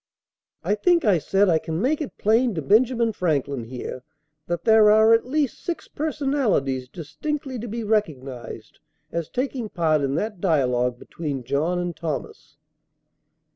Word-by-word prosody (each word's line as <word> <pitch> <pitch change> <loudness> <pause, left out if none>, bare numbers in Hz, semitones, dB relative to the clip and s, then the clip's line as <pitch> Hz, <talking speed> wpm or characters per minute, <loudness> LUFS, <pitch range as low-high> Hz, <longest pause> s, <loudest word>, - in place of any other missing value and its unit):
] - - -55
I - - +1
think, 340 - +2
I 195 -6 +4
said, 195 +6 +2
I 165 -3 +3
can 160 +1 -4
make 285 - +1
it 295 - -6
plain 225 +1 +2
to 160 - -2
Benjamin 230 - +3
Franklin 140 - -1
here, 125 +1 -6 0.5
that 175 0 -2
there 220 -1 +6
are 220 +1 +6
at 230 +2 +2
least 285 -1 -1
six 345 - -4
personalities 270 - -1
distinctly 260 - -5
to 240 - -6
be 230 +1 -4
recognized 145 - -3 0.3
as 170 -2 -3
taking 255 -3 -3
part 160 -5 +1
in 140 0 -1
that 210 -2 -3
dialogue 125 -7 +1
between 140 -2 -5
John 145 +8 0
and 175 -1 -3
Thomas. 160 -3 -6
195 Hz, 155 wpm, -24 LUFS, 150-235 Hz, 0.5 s, there